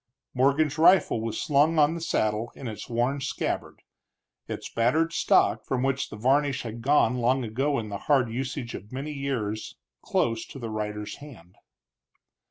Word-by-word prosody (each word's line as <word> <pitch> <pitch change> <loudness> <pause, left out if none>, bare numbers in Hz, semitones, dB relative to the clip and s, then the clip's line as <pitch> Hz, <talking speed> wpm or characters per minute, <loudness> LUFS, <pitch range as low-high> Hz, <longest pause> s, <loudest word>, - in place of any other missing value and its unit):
Morgan's 140 +4 +2
rifle 175 -8 +5
was 115 -1 -3
slung 150 +2 +3
on 150 +1 +4
the 170 - -5
saddle 110 -7 0
in 135 - -7
its 110 +2 -7
worn 120 +4 0
scabbard, 135 - -3 0.6
its - - -5
battered 155 +9 +1
stock, 110 -8 +3
from 130 -1 -1
which 135 0 0
the - - -8
varnish 135 +4 +1
had 115 0 -6
gone 125 -2 +3
long 125 +2 +2
ago 135 +6 0
in 110 -2 -4
the 100 -1 -5
hard 135 -4 +4
usage 125 0 -4
of 105 - -9
many 140 +4 -5
years, 120 - -3 0.2
close 115 -1 0
to - - -10
the 115 -4 -5
rider's 105 -1 -4
hand. 115 - -13
130 Hz, 165 wpm, -26 LUFS, 115-145 Hz, 0.6 s, rifle